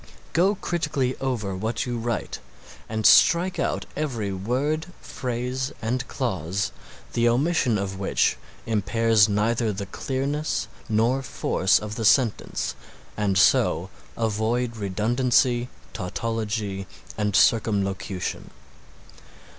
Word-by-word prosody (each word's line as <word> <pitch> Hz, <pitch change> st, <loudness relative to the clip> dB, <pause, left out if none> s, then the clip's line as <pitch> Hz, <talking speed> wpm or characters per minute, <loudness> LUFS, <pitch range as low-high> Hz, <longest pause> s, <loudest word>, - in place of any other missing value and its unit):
Go 190 Hz, +5 st, +3 dB
critically 150 Hz, -8 st, -1 dB
over 115 Hz, -8 st, -2 dB
what 110 Hz, +5 st, -2 dB
you 120 Hz, -2 st, -3 dB
write 115 Hz, 0 st, -3 dB, 0.5 s
and 110 Hz, 0 st, -2 dB
strike 180 Hz, +2 st, +6 dB
out -, -, -1 dB
every 120 Hz, -10 st, -2 dB
word, 135 Hz, -, -1 dB
phrase 125 Hz, +2 st, -3 dB
and 125 Hz, +3 st, -2 dB
clause 95 Hz, -, -2 dB, 0.4 s
the 120 Hz, 0 st, +3 dB
omission 130 Hz, -2 st, +2 dB
of 95 Hz, -1 st, -4 dB
which 95 Hz, -, +2 dB, 0.3 s
impairs 110 Hz, 0 st, +3 dB
neither 110 Hz, +2 st, +1 dB
the 100 Hz, 0 st, -4 dB
clearness 140 Hz, +7 st, -2 dB, 0.2 s
nor 115 Hz, +5 st, +2 dB
force 95 Hz, -7 st, +1 dB
of 105 Hz, 0 st, -5 dB
the 115 Hz, -, -2 dB
sentence 120 Hz, 0 st, +2 dB, 0.4 s
and 100 Hz, -3 st, 0 dB
so -, -, +3 dB, 0.3 s
avoid 115 Hz, +2 st, 0 dB
redundancy, 120 Hz, +4 st, +1 dB, 0.2 s
tautology 105 Hz, -1 st, -3 dB, 0.3 s
and 105 Hz, -1 st, -1 dB
circumlocution. 100 Hz, -4 st, +1 dB
115 Hz, 105 wpm, -25 LUFS, 105-130 Hz, 0.5 s, strike